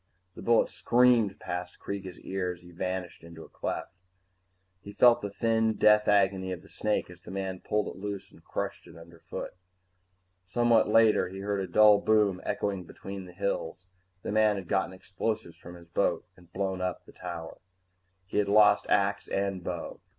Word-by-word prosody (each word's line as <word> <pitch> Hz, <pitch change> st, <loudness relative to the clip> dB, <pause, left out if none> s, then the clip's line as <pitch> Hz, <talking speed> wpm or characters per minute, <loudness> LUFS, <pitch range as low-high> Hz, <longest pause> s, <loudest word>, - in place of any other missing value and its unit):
The -, -, -10 dB
bullet 115 Hz, -1 st, +3 dB
screamed 120 Hz, -4 st, +3 dB
past 90 Hz, 0 st, -5 dB
Kreega's 95 Hz, -3 st, -6 dB
ear 95 Hz, -1 st, -2 dB
as 85 Hz, -, -16 dB
he 90 Hz, -, -14 dB
vanished 90 Hz, 0 st, -4 dB
into 85 Hz, -1 st, -11 dB
a -, -, -13 dB
cleft. -, -, -4 dB, 0.9 s
He 100 Hz, -, -10 dB
felt 120 Hz, +2 st, +5 dB
the 100 Hz, -, -3 dB
thin 110 Hz, +2 st, +1 dB
death 105 Hz, 0 st, +4 dB
agony 95 Hz, -2 st, +2 dB
of 90 Hz, -1 st, -6 dB
the -, -, -17 dB
snake 105 Hz, -4 st, -1 dB
as 90 Hz, 0 st, -15 dB
the -, -, -12 dB
man 95 Hz, -1 st, -4 dB
pulled 105 Hz, +3 st, -1 dB
it -, -, -7 dB
loose 100 Hz, -1 st, -5 dB
and -, -, -19 dB
crushed -, -, -5 dB
it 85 Hz, -, -14 dB
underfoot. 85 Hz, 0 st, -8 dB, 0.9 s
Somewhat 120 Hz, +1 st, +3 dB
later, 110 Hz, -4 st, +4 dB
he 95 Hz, +1 st, -7 dB
heard 100 Hz, 0 st, -1 dB
a 95 Hz, -, -3 dB
dull 105 Hz, +1 st, +7 dB
boom 105 Hz, -4 st, +2 dB
echoing 95 Hz, -3 st, -2 dB
between 95 Hz, +2 st, -8 dB
the 90 Hz, -, -11 dB
hills. 90 Hz, -1 st, -3 dB, 0.4 s
The -, -, -3 dB
man 110 Hz, 0 st, +3 dB
had 95 Hz, -3 st, -6 dB
gotten 95 Hz, +1 st, 0 dB
explosives 95 Hz, 0 st, -4 dB
from 85 Hz, +1 st, -11 dB
his 85 Hz, -1 st, -14 dB
boat 85 Hz, -, 0 dB
and 90 Hz, -1 st, -20 dB
blown 95 Hz, -1 st, -2 dB
up 90 Hz, -1 st, -3 dB
the -, -, -15 dB
tower. 85 Hz, -1 st, -7 dB, 0.7 s
He 95 Hz, -, -1 dB
had 105 Hz, -, +1 dB
lost 105 Hz, 0 st, +5 dB
axe 100 Hz, 0 st, +1 dB
and 100 Hz, -2 st, -2 dB
bow. -, -, -5 dB
95 Hz, 180 wpm, -29 LUFS, 90-105 Hz, 0.9 s, dull